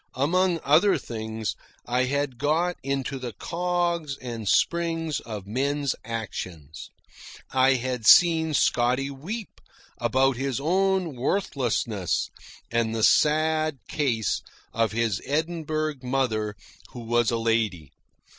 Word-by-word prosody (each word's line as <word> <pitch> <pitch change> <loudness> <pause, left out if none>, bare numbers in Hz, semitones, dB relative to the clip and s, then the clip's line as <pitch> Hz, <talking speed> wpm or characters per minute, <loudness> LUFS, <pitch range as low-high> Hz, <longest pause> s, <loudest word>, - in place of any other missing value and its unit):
Among 170 +6 +2
other 160 +8 +4
things, 110 -2 -4 0.3
I 125 +1 +1
had 140 -2 -2
got 165 +5 +1
into 135 0 -2
the 125 -3 -5
cogs 170 - -1
and 115 -5 -5
springs 165 -3 +1
of 105 -4 -7
men's 140 +5 -1
actions. 90 -9 -6 0.6
I 130 0 +4
had 125 -3 -2
seen 160 -3 +6
Scotty 130 +2 +2
weep 190 +11 -7 0.4
about 135 -1 +2
his 135 -1 -2
own 185 0 +1
worthlessness 120 - -1 0.4
and 115 -1 0
the 110 - -1
sad 155 +1 +3
case 120 - 0 0.3
of 115 -1 +1
his 110 -3 0
Edinburgh 155 0 -1
mother 125 -5 -1 0.4
who 120 - -7
was 120 0 +1
a 115 - 0
lady. 110 -10 0
135 Hz, 115 wpm, -25 LUFS, 115-155 Hz, 0.6 s, seen